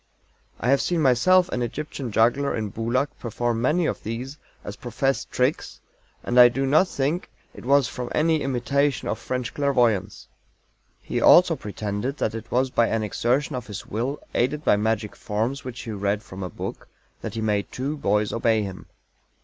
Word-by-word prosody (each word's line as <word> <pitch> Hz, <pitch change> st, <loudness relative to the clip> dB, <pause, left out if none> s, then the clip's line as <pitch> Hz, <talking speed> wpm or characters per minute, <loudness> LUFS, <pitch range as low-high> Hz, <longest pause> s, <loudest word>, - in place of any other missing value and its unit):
I 125 Hz, -, +1 dB
have 140 Hz, -, +4 dB
seen 175 Hz, -2 st, 0 dB
myself 165 Hz, +7 st, +4 dB
an 125 Hz, -, -2 dB
Egyptian 135 Hz, 0 st, -4 dB
juggler 120 Hz, +6 st, +2 dB
in 110 Hz, -2 st, -3 dB
Boulak 120 Hz, +7 st, 0 dB
perform 120 Hz, 0 st, -2 dB
many 155 Hz, +7 st, +2 dB
of -, -, -2 dB
these 125 Hz, +6 st, -6 dB, 0.2 s
as 105 Hz, -, -6 dB
professed 130 Hz, +3 st, -2 dB
tricks, 130 Hz, +4 st, -1 dB, 0.4 s
and 125 Hz, +1 st, +2 dB
I 120 Hz, 0 st, +10 dB
do 135 Hz, +3 st, -1 dB
not 155 Hz, +8 st, +4 dB
think 150 Hz, +3 st, -2 dB, 0.2 s
it -, -, -12 dB
was 140 Hz, -1 st, +4 dB
from 125 Hz, -1 st, -5 dB
any 160 Hz, 0 st, +2 dB
imitation 135 Hz, +1 st, 0 dB
of -, -, -2 dB
French 125 Hz, -2 st, -3 dB
clairvoyance. 120 Hz, -9 st, +1 dB, 0.8 s
He -, -, -2 dB
also -, -, +7 dB
pretended 105 Hz, +6 st, -4 dB
that -, -, -1 dB
it 115 Hz, 0 st, -7 dB
was 130 Hz, +1 st, +1 dB
by 115 Hz, -2 st, +3 dB
an 115 Hz, -1 st, 0 dB
exertion 125 Hz, +7 st, 0 dB
of 125 Hz, -3 st, -5 dB
his 105 Hz, -2 st, -7 dB
Will, 125 Hz, +7 st, -3 dB
aided 145 Hz, +5 st, 0 dB
by -, -, +5 dB
magic 105 Hz, 0 st, -1 dB
forms 115 Hz, +7 st, -2 dB
which 125 Hz, -2 st, -7 dB
he 115 Hz, -, -6 dB
read 100 Hz, 0 st, -1 dB
from 95 Hz, +1 st, -9 dB
a 90 Hz, -, -4 dB
book, -, -, -7 dB, 0.3 s
that -, -, -6 dB
he 110 Hz, -, -2 dB
made 105 Hz, -2 st, -1 dB
two 140 Hz, +4 st, -3 dB
boys 105 Hz, -6 st, 0 dB
obey 115 Hz, -2 st, +2 dB
him. 95 Hz, -2 st, -8 dB
120 Hz, 180 wpm, -24 LUFS, 110-140 Hz, 0.8 s, I